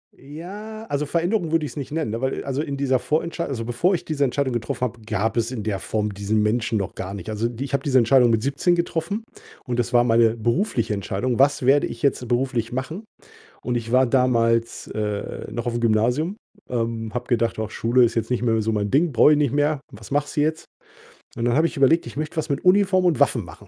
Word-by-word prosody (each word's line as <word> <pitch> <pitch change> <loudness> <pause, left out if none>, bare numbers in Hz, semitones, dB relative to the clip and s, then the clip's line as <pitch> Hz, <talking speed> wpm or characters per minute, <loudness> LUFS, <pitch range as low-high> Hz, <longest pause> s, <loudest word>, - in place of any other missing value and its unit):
Ja, 200 +10 -9
also, 145 -7 -2
Veränderung 170 +3 0
würde 165 -2 +2
ich's - - -8
nicht 140 -3 -6
nennen, 155 -7 -2
ne, 115 +2 -4
weil 130 0 -2
also, 135 +1 -1
in 140 -2 -4
dieser 135 -2 +2
Vorentscheid 170 +5 -2
also, 115 -5 -3
bevor 120 +11 +1
ich 175 - -2
diese 150 -3 -1
Entscheidung 135 0 0
getroffen 120 +2 -3
habe, 120 -2 -2
gab 110 0 -1
es 115 0 0
in 115 -5 -4
der 100 -2 -2
Form 105 -1 -2
diesen 100 +2 0
Menschen 115 +2 0
noch 100 -2 -4
gar 95 +1 -5
nicht. 100 0 -7
Also, 110 +2 -1
ich 140 0 -4
habe 140 - 0
diese 140 -4 +2
Entscheidung 125 0 +5
mit 115 -1 +2
17 140 +7 +1
getroffen, 170 +5 -2 0.4
und 125 -3 -2
das 120 0 -1
war 120 -1 +4
meine 115 -1 +3
berufliche 115 - 0
Entscheidung: 105 +5 -2
„Was 140 0 +3
werde 140 +2 +4
ich - - -9
jetzt 140 -3 +1
beruflich 120 -1 -1
machen?“ 130 - -4 0.6
Und 125 - -1
ich 115 -1 -4
war 130 +1 +5
damals, 115 -2 +1
äh, 105 -1 -4
noch 120 +1 -4
auf'm 120 0 -1
Gymnasium, 120 - +1 0.3
ähm, 115 -2 -3
habe 125 0 -3
gedacht: 115 -2 0
„Ach 110 -1 -3
Schule 120 +3 +3
ist 115 -1 0
jetzt 115 - -2
nicht 125 -1 0
mehr 115 -2 +2
so 110 +1 -1
mein 105 -1 -1
Ding, 155 +4 +2
brauche 130 +5 +6
ich 150 - +3
nicht 145 -5 +1
mehr. 145 0 +1
Was 105 0 -12
machst 145 +1 -1
du 145 - +3
jetzt?“ 155 +1 -1 0.7
Und 115 - -3
dann 120 0 +2
habe 160 +3 +4
ich - - -8
überlegt, 140 +4 +3
ich 120 - -9
möchte 155 +3 -4
was 160 0 -2
mit 140 -1 -2
Uniform 185 0 +4
und 170 -5 +2
Waffen 130 -5 +2
machen. 85 +4 -13
125 Hz, 230 wpm, -23 LUFS, 115-150 Hz, 0.7 s, brauche